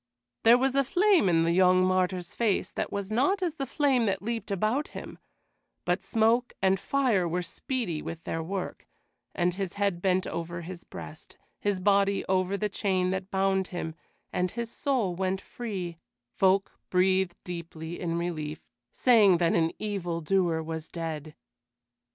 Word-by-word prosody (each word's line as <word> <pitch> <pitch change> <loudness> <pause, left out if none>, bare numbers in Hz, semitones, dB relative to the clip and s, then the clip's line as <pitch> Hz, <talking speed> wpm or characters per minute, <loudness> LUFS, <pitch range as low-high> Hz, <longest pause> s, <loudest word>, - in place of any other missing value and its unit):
There 235 +2 +7
was 265 +1 +1
a 275 0 +3
flame 360 - +4
in 165 -1 +4
the 165 - +2
young 185 +1 +5
martyr's 185 -1 0
face 210 -5 0
that - - -3
was 200 0 -4
not 290 - +2
as 340 -4 0
the 275 -4 -4
flame 265 -5 +2
that 195 -1 -1
leaped 225 -1 -3
about 215 +9 0
him; - - -8 0.7
but - - +1
smoke 230 +2 +2
and 190 0 +3
fire 240 -10 +1
were 180 +2 -1
speedy 175 - -3
with 165 0 -7
their 165 - -3
work, 185 +3 -5 0.5
and 175 0 +1
his 190 -1 -3
head 200 -4 0
bent 185 0 +2
over 170 +1 -4
his 175 +1 -8
breast, 155 - -10 0.2
his 205 -2 0
body 200 +1 +2
over 185 +1 +1
the 210 - 0
chain 190 -3 0
that 190 0 -3
bound 190 -1 +1
him, 165 -3 -4 0.4
and 180 0 +1
as - - -15
his 235 -1 -3
soul 240 -11 0
went 190 +1 -1
free, 190 -8 -6 0.3
folk 195 +1 +3 0.2
breathed 185 -1 +2
deeply 170 -1 -6
in 170 -2 -2
relief, 160 -3 -4 0.3
saying 215 -7 +5
that 170 -1 +2
an 165 -1 +2
evil 185 -5 -3
doer 170 -1 +1
was 160 0 -5
dead. 160 -2 -5
190 Hz, 165 wpm, -28 LUFS, 175-215 Hz, 0.7 s, There